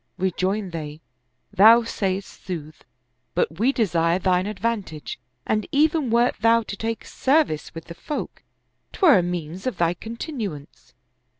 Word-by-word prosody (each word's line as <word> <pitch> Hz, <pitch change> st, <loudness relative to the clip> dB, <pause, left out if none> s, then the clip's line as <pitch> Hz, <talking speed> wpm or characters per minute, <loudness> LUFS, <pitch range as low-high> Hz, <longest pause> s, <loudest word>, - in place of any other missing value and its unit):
Rejoined 190 Hz, +2 st, -1 dB
they, 155 Hz, -2 st, -6 dB, 0.5 s
"Thou 220 Hz, +4 st, +7 dB
sayest 195 Hz, -3 st, -3 dB
sooth, 155 Hz, -4 st, -7 dB, 0.5 s
but 160 Hz, -, 0 dB
we 245 Hz, +5 st, +3 dB
desire 175 Hz, -9 st, +1 dB
thine 185 Hz, 0 st, +1 dB
advantage, 205 Hz, -, -4 dB, 0.3 s
and 215 Hz, 0 st, 0 dB
even 300 Hz, -1 st, +2 dB
wert 235 Hz, +2 st, +3 dB
thou 230 Hz, +1 st, +4 dB
to 205 Hz, -, -6 dB
take 225 Hz, +2 st, -4 dB
service 270 Hz, -, 0 dB
with 165 Hz, -, -8 dB
the 170 Hz, -, -9 dB
folk, 295 Hz, -, -6 dB, 0.5 s
'twere 315 Hz, -, +5 dB
a -, -, +2 dB
means 175 Hz, +2 st, -4 dB
of 240 Hz, -8 st, -2 dB
thy 170 Hz, 0 st, +2 dB
continuance." 210 Hz, -, -7 dB
195 Hz, 135 wpm, -23 LUFS, 170-230 Hz, 0.5 s, Thou